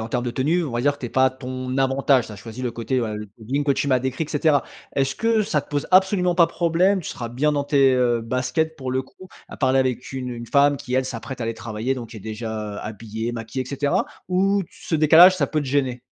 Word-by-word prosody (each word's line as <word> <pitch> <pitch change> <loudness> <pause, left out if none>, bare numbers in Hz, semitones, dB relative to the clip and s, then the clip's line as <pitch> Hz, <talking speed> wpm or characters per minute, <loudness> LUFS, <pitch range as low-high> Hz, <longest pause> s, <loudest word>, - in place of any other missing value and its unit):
en 110 - -5
termes 125 +1 -2
de 120 - -3
tenue, 160 +7 +1
on 135 - -5
va 120 - -1
dire 145 +2 +2
que - - -18
tu 125 - -5
es - - -6
pas 130 +2 +3
à 130 - +2
ton 130 0 -5
avantage, 135 -1 +2
tu 110 - -10
as - - -9
choisis 115 +5 -9
le 120 - -2
côté, 120 +2 -1
ouais, 110 -3 -2
le 105 0 -7
jogging 130 +6 -2
que 140 - +1
tu 140 - +1
m'as 130 -2 +2
décrit 130 +5 -2
et - - -12
cetera. 145 -2 +2 0.3
Est-ce 135 0 +1
que 225 -1 +2
ça 155 -7 0
te 145 - -18
pose 145 -1 -1
absolument 185 -1 +4
pas 170 -1 +5
problème, 175 +4 +2
tu 165 - -7
seras 120 - -5
bien 140 +6 0
dans 145 -1 0
tes, 140 -2 +3
heu, 120 -2 +2
baskets 130 +7 -1
pour 130 -4 -5
le 130 +1 0
coup 185 +7 -16 0.2
à - - -9
parler 130 -1 +2
avec 130 -1 -1
une 130 -1 -4
une 120 -1 -7
femme 140 +2 +4
qui, 125 - -8
elle, 130 0 +2
s'apprête 130 +1 -6
à - - -1
aller 115 0 -2
travailler, 115 +3 -3
donc 120 -3 -8
qui 115 - -10
est - - -9
déjà 110 -1 -5
habillée, 110 +2 -5
maquillée 120 +2 -4
et - - -10
cetera, 140 0 0 0.2
ou 195 +2 +2
t - - -24
ce 160 - -3
décalage, 165 +5 +7
ça - - +1
peut 155 - -1
te 145 - -5
gêner? 130 -2 0
130 Hz, 275 wpm, -22 LUFS, 120-150 Hz, 0.3 s, décalage